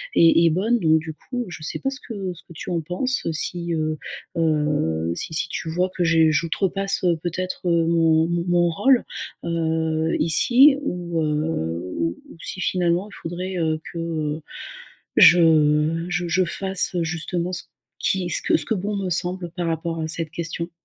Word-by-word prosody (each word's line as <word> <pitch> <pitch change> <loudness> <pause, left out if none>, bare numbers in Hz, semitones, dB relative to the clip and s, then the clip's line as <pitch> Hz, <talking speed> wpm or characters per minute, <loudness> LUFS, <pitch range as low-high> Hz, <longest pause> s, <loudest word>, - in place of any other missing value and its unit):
est 165 0 +6
est - - +6
bonne 220 +8 +1
donc 160 -2 +4
du 160 0 -7
coup, 245 +8 -5
je 160 -3 -8
sais - - -4
pas, 270 - -1
ce 270 +1 -5
que 195 -5 -5
ce 170 - -16
que 170 - -14
tu 160 - -7
en 170 -2 0
penses, 185 - -2
si, 170 +2 -3
heu 155 -1 -1 0.4
heu, 150 - +1
si 160 - -4
si 160 - 0
tu 160 - -4
vois 180 +3 0
que 180 - 0
je 165 -1 +4
j'outrepasse 190 +5 0 0.2
peut-être 180 +1 -3
mon 165 -1 +3
mon 170 0 -1
mon 175 -1 +3
rôle, 255 +9 +3 0.4
heu, 160 -1 0
ici 255 - +5
ou, 175 - -3
heu, 120 - -2
ou 85 +1 0
ou - - -13
si 185 - -5
finalement 180 +2 0
il - - -15
faudrait, 180 +3 -5
heu, 160 -2 0
que, - - -7
heu, 155 -2 -3 0.8
je, 175 +1 +8
heu, 155 +1 +3
je 175 0 -1
je 185 +2 +2
fasse, 190 +1 +2
heu, 170 -2 0
justement 175 +2 -3
ce - - -3 0.3
qui 185 -2 0
ce - - +2
que - - +3
ce 150 - 0
que 220 - -1
bon 205 +2 -3
me 190 -2 -2
semble 175 0 -2
par 175 -1 -4
rapport 165 0 -2
à 160 - -3
cette 165 -1 -1
question. 170 +1 -4
170 Hz, 185 wpm, -23 LUFS, 160-180 Hz, 0.8 s, je